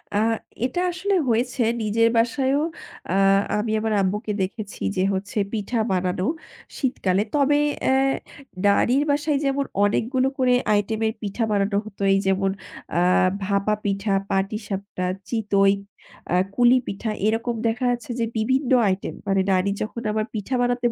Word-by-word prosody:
আ -, -, +3 dB, 0.5 s
এটা 260 Hz, +7 st, -2 dB
আসলে 375 Hz, +3 st, -1 dB, 0.2 s
হয়েছে 245 Hz, +3 st, 0 dB, 0.2 s
নিজের 230 Hz, +2 st, +2 dB
বাসায়ও। 265 Hz, +4 st, +2 dB, 0.5 s
আ -, -, -2 dB, 0.5 s
আমি 215 Hz, +1 st, -1 dB
আমার 220 Hz, 0 st, -1 dB
আম্মুকে 210 Hz, +3 st, -1 dB
দেখেছি 200 Hz, +2 st, -5 dB
যে -, -, +1 dB
হচ্ছে 195 Hz, +3 st, -4 dB, 0.2 s
পিঠা 225 Hz, +2 st, -1 dB
বানানো 185 Hz, 0 st, 0 dB, 0.5 s
শীতকালে। 200 Hz, -8 st, 0 dB
তবে 290 Hz, 0 st, +3 dB, 0.3 s
অ্যা 265 Hz, -, +3 dB, 0.7 s
নানীর 240 Hz, +7 st, +3 dB
বাসায় 290 Hz, 0 st, +1 dB
যেমন 275 Hz, 0 st, 0 dB, 0.2 s
অনেকগুলো 250 Hz, +6 st, +1 dB
করে 255 Hz, -1 st, +3 dB, 0.2 s
আইটেমের 220 Hz, +2 st, 0 dB
পিঠা 210 Hz, +2 st, -2 dB
বানানো 200 Hz, 0 st, +1 dB
হতো, 210 Hz, -2 st, -11 dB
এই 195 Hz, -, +3 dB
যেমন 195 Hz, 0 st, +2 dB, 0.4 s
আ 175 Hz, -, +2 dB, 0.4 s
ভাপা 200 Hz, +2 st, +1 dB
পিঠা, 200 Hz, 0 st, -1 dB, 0.2 s
পাটিসাপটা, 195 Hz, -1 st, -3 dB, 0.3 s
চিতই, 200 Hz, -3 st, +3 dB, 0.6 s
আ -, -, +1 dB, 0.2 s
কুলি 245 Hz, +3 st, +5 dB
পিঠা 200 Hz, +3 st, -4 dB, 0.2 s
এরকম 230 Hz, +2 st, 0 dB
দেখা 230 Hz, +3 st, -1 dB
যাচ্ছে 245 Hz, 0 st, -4 dB
যে 230 Hz, -, +2 dB
বিভিন্ন 260 Hz, +4 st, +1 dB, 0.2 s
আইটেম। 185 Hz, 0 st, -1 dB
মানে 195 Hz, -1 st, +2 dB
নানি 185 Hz, +1 st, +2 dB
যখন 225 Hz, +2 st, -4 dB
আমার 215 Hz, 0 st, -1 dB
পিঠা 215 Hz, +4 st, -4 dB
বানাতেন 245 Hz, -1 st, +1 dB
220 Hz, 140 wpm, -23 LUFS, 200-245 Hz, 0.7 s, কুলি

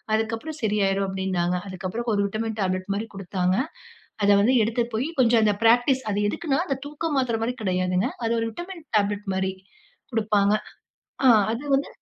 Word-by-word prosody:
அதுக்கப்புறம் 225 Hz, +8 st, -3 dB
சரியாயிரும்" 200 Hz, -2 st, +1 dB
அப்டின்னாங்க. 190 Hz, -2 st, -1 dB
அதுக்கப்புறம் 190 Hz, +5 st, -4 dB
ஒரு 200 Hz, -, +2 dB
விட்டமின் 220 Hz, +2 st, -3 dB
டேப்லெட் 185 Hz, 0 st, -1 dB
மாரி 220 Hz, +2 st, -3 dB
குடுத்தாங்க. 185 Hz, -1 st, -1 dB, 0.7 s
அத 200 Hz, -, +4 dB
வந்து 245 Hz, +6 st, +3 dB
எடுத்துட்டு 230 Hz, +1 st, -1 dB
போயி, 265 Hz, +8 st, -1 dB
கொஞ்சம் 230 Hz, -2 st, +4 dB
அந்த 210 Hz, -1 st, +3 dB
பிராக்டிஸ் 245 Hz, +3 st, +4 dB
அது 200 Hz, -, 0 dB
எதுக்குன்னா 295 Hz, +1 st, -1 dB
அந்த 275 Hz, -, -1 dB
தூக்க 300 Hz, +2 st, -3 dB
மாத்திரை 235 Hz, -4 st, +1 dB
மாரி 245 Hz, +2 st, -1 dB
கெடையாதுங்க. 185 Hz, +3 st, +1 dB, 0.2 s
அது 230 Hz, -, +1 dB
ஒரு 225 Hz, -, -1 dB
விட்டமின் 345 Hz, -, -8 dB
டேப்லெட் 205 Hz, 0 st, -1 dB
மாரி 190 Hz, 0 st, -1 dB, 0.6 s
குடுப்பாங்க. 210 Hz, -2 st, +2 dB, 0.7 s
ஆ 260 Hz, -, +7 dB, 0.2 s
அது 230 Hz, +5 st, -4 dB
வந்து 275 Hz, +1 st, +1 dB
220 Hz, 160 wpm, -24 LUFS, 195-245 Hz, 0.7 s, ஆ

